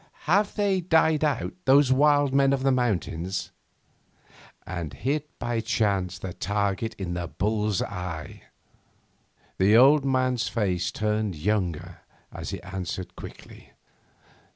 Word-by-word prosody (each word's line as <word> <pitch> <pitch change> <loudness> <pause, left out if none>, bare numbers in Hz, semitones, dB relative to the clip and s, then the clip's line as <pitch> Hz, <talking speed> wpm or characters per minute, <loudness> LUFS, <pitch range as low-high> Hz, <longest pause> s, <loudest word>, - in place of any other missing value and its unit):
Have 200 +5 +2
they 200 -3 +1
died 160 -3 +3
out, 150 -2 0
those 135 0 +5
wild 145 0 +3
men 135 0 +4
of 135 -1 -1
the 135 - +3
mountains?' 95 -7 -1 1.1
And 85 -5 -5
hit 150 +2 -2
by 120 -1 -2
chance 100 -5 0
the 95 -2 -6
target 100 +3 -2
in 90 -3 -4
the 90 -1 -3
bull's 105 +2 -1
eye. 90 -5 -6 1.1
The 100 +4 +5
old 140 +4 +6
man's 130 -3 +1
face 95 -6 -1
turned 105 -3 -1
younger 90 -1 -2 0.3
as - - -6
he - - -5
answered 95 -1 -5
quickly. - - -12
110 Hz, 125 wpm, -26 LUFS, 95-135 Hz, 1.1 s, old